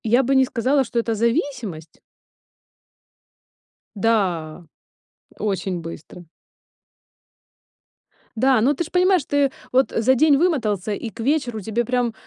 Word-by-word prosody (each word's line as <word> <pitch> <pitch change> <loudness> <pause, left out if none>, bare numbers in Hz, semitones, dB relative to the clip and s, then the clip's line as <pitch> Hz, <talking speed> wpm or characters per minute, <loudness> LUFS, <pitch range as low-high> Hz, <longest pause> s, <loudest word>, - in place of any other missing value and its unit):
Я 240 +4 +3
бы 270 +2 +1
не 265 0 +5
сказала, 260 +3 +1
что 240 -1 -6
это 230 0 -1
зависимость. 230 - -2 2.0
Да, 185 -7 -1 0.7
очень 190 -3 -2
быстро. 165 +1 -10 2.1
Да, 255 0 +3
но 270 +6 +3
ты 320 - -2
ж - - -9
понимаешь, 365 -4 +3
ты 285 -2 +1 0.2
вот 260 +1 +2
за 245 +4 +3
день 290 +2 +4
вымотался, 220 - 0
и 225 +3 -5
к 215 - -17
вечеру 245 -2 -1
тебе 220 +4 -2
прям, 245 -1 -1
235 Hz, 120 wpm, -21 LUFS, 205-270 Hz, 2.1 s, не